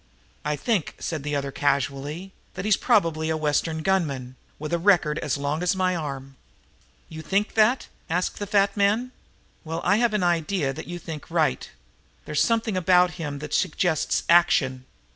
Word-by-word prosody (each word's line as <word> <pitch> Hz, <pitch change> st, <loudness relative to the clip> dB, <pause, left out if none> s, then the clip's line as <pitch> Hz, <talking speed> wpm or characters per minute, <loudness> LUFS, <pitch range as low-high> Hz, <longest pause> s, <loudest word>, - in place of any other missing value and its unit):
"I 150 Hz, 0 st, -1 dB
think," 205 Hz, 0 st, -1 dB
said 160 Hz, -4 st, -4 dB
the 150 Hz, +1 st, -3 dB
other 140 Hz, -1 st, -2 dB
casually, 145 Hz, +6 st, -2 dB, 0.2 s
"that 185 Hz, +1 st, -5 dB
he's 215 Hz, -2 st, +4 dB
probably 165 Hz, -11 st, +1 dB
a 160 Hz, -, 0 dB
Western 155 Hz, +1 st, 0 dB
gunman, 140 Hz, -10 st, -1 dB, 0.2 s
with 155 Hz, +3 st, -5 dB
a 170 Hz, -, +2 dB
record 165 Hz, -5 st, +3 dB
as 150 Hz, -2 st, -1 dB
long 145 Hz, +3 st, -2 dB
as 180 Hz, +1 st, +1 dB
my 185 Hz, -1 st, +1 dB
arm." 135 Hz, -4 st, -6 dB, 0.7 s
"You 160 Hz, -1 st, -8 dB
think 200 Hz, +5 st, 0 dB
that?" 225 Hz, +4 st, +3 dB, 0.2 s
asked 180 Hz, +3 st, -1 dB
the 205 Hz, -, -4 dB
fat 200 Hz, -1 st, +2 dB
man. 215 Hz, +5 st, +1 dB, 0.5 s
"Well, 165 Hz, 0 st, -4 dB
I've 215 Hz, +4 st, +2 dB
an 205 Hz, -, +1 dB
idea 170 Hz, -4 st, 0 dB
that -, -, -8 dB
you 175 Hz, +1 st, -5 dB
think 160 Hz, -3 st, -8 dB
right. 160 Hz, -5 st, 0 dB, 0.6 s
There's 150 Hz, -, 0 dB
something 225 Hz, -3 st, +1 dB
about 180 Hz, 0 st, +4 dB
him 145 Hz, -3 st, -4 dB
that 150 Hz, -, -8 dB
suggests 160 Hz, -1 st, +1 dB
action. 135 Hz, -7 st, +3 dB
165 Hz, 165 wpm, -25 LUFS, 150-190 Hz, 0.7 s, he's